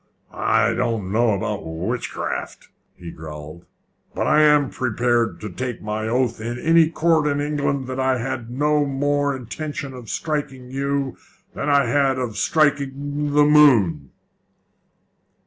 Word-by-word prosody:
"I - - +2
don't 105 -5 -2
know 115 +1 +3
about 100 +1 -3
witchcraft," 80 0 -4 0.3
he 85 -2 -9
growled; 75 +1 -10 0.5
"but - - -1
I 155 - +4
am 150 -3 +4
prepared 120 -1 0
to 105 - -5
take 125 +5 -4
my 105 +1 -3
oath 120 -1 0
in 120 +2 -4
any 165 +3 +4
court 160 -2 +2
in 145 -1 0
England 145 -2 -1
that 130 +1 -5
I 130 0 +2
had 120 -1 -4
no 150 +4 +1
more 145 +1 0
intention 140 +2 -6
of 125 -3 -10
striking 135 -5 -4
you 140 0 -2 0.4
than 140 - -3
I 140 -2 +4
had 135 +2 +2
of 125 -4 -3
striking 145 +1 0
the 150 0 +6
moon." 115 - +4
130 Hz, 140 wpm, -22 LUFS, 115-145 Hz, 0.5 s, the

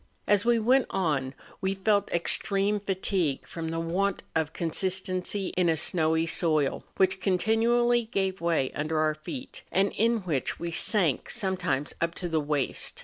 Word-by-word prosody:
As 205 -1 +3
we 240 0 +4
went 250 +4 +3
on, 145 -8 -1 0.3
we 190 +1 0
felt 200 +1 +1
extreme 200 +4 +2
fatigue 190 -6 -1
from 165 -1 -5
the 165 0 -2
want 185 +4 -1
of 160 -2 0
con¬ 165 0 -3
sistency 185 +2 -1
in 180 -2 +2
a 160 - +2
snowy 160 0 +2
soil, 155 -4 +1
which 190 0 +2
continually 230 +5 +2
gave 195 -4 -2
way 165 -6 +1
under 155 +1 -1
our 155 0 +2
feet, 255 - -8
and 195 +2 +2
in 230 +1 +1
which 155 -9 -2
we 170 0 -4
sank 165 - +1
sometimes 185 - -1
up 170 0 -1
to 180 - -3
the 160 -2 0
waist. 145 -2 -2
185 Hz, 160 wpm, -27 LUFS, 160-200 Hz, 0.3 s, we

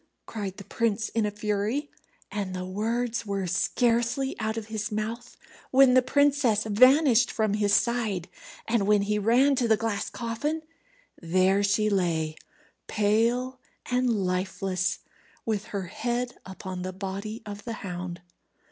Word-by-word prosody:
cried 200 -4 -5
the 200 - -8
prince, 225 +1 -1
in 225 -2 0
a - - 0
fury; 210 +7 -2 0.4
and 195 -3 -3
the 185 0 -4
words 225 +5 -1
were 200 -3 -2
scarcely 235 +8 +1
out 220 0 -2
of 225 - -4
his 220 +1 -4
mouth 225 +3 -4 0.3
when 265 -1 +6
the 255 - +6
princess 275 -5 +3
vanished 250 +3 +5
from 215 -2 0
his 205 -1 +1
side, 215 -4 +1 0.4
and 225 -3 +1
when 210 -1 +4
he 210 +1 0
ran 245 +7 +4
to 250 -2 +1
the 220 -1 +4
glass 215 -2 -2
coffin, 290 +7 -3 0.6
there 185 +3 +3
she 210 +1 +2
lay, 170 -6 0 0.5
pale 235 +5 +1 0.3
and 250 0 +2
lifeless, 190 -2 -1 0.4
with 215 -3 -1
her 200 -2 -4
head 240 +6 -3
upon 190 -1 -6
the 185 +1 -3
body 200 +4 -5
of 205 -1 -7
the 230 - -4
hound. 180 -1 -5
215 Hz, 145 wpm, -27 LUFS, 195-240 Hz, 0.6 s, when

